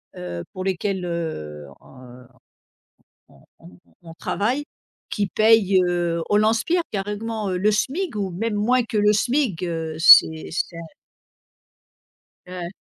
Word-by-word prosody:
heu, 85 -1 -6
pour 185 - -5
lesquelles, 190 0 -2
heu, 75 - -5
on 125 -1 -15 1.0
on - - -22 0.2
on 90 +1 -16 0.2
on 165 -1 -11
travaille 245 +11 -2 0.5
qui 205 -2 -1
payent, 215 -2 +4
heu, 175 -1 -1
au 205 - +3
lance-pierre. 225 +11 +2
Carrément, 210 +1 -4
heu, 185 - -1
le 210 +4 +2
SMIC 290 - -2
ou 200 -2 -2
même 215 +5 -3
moins 245 +5 +2
que 225 -1 -4
le 210 0 +4
SMIC. 240 - 0
Heu, 165 -2 -4
c'est 160 -1 +7
c'est 165 0 -3 1.7
Ouais. 180 -1 -6
190 Hz, 130 wpm, -22 LUFS, 165-215 Hz, 1.7 s, c'est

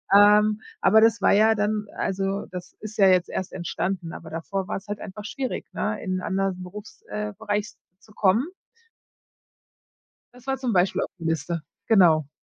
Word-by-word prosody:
Ähm, 210 +1 +6 0.2
aber 215 +3 +6
das 225 0 +4
war - - +4
ja 220 +2 +5
dann 210 0 -1
also, 195 +1 -1
das 180 -1 -8
ist 215 0 -8
ja 195 -2 +6
jetzt 180 -1 +4
erst 190 - -4
entstanden, 175 0 -3
aber 165 - -9
davor 185 +4 -4
war - - -1
es 195 +2 -12
halt 205 0 -4
einfach 205 +2 -8
schwierig, 255 +4 -4
ne, 215 0 -2
in 185 -2 -2
anderen 190 -1 -1
Berufs 205 +4 -10
äh, 210 0 -3
Bereich 210 -1 -2 0.3
zu 215 - -20
kommen. 215 +7 +2 1.9
Das 250 +1 -17
war 270 0 -1
zum 255 -3 -1
Beispiel 185 -1 +2
auf - - -3
die 165 - -9
Liste. 165 0 -1 0.2
Genau. 165 -9 +5
200 Hz, 175 wpm, -25 LUFS, 185-215 Hz, 1.9 s, Ähm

